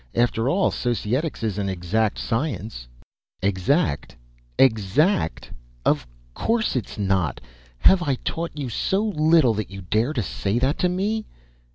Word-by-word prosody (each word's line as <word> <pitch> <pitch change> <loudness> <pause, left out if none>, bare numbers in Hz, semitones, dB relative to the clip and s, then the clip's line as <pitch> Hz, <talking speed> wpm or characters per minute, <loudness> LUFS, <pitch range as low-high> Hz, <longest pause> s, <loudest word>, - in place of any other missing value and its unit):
After 120 0 +2
all, 190 +7 +2
Societics 120 +5 -1
is 105 -3 -1
an 100 -1 -1
exact 95 +4 0
science 110 - -3 0.3
" - - -49
"Exact? 95 - 0 0.4
Exact! 110 - +2 0.3
Of 65 - +2 0.3
course 225 - 0
it's 125 - -3
not! 95 -8 0 0.4
Have 190 - +5
I 140 -6 +1
taught 165 +4 -4
you 140 -3 -3
so 190 - 0
little 155 - +4
that 105 -3 -3
you 95 0 -8
dare 110 - 0
say 105 -2 -1
that 130 +4 +1
to 180 - +2
me?" 210 +4 -1
120 Hz, 140 wpm, -23 LUFS, 100-160 Hz, 0.4 s, Have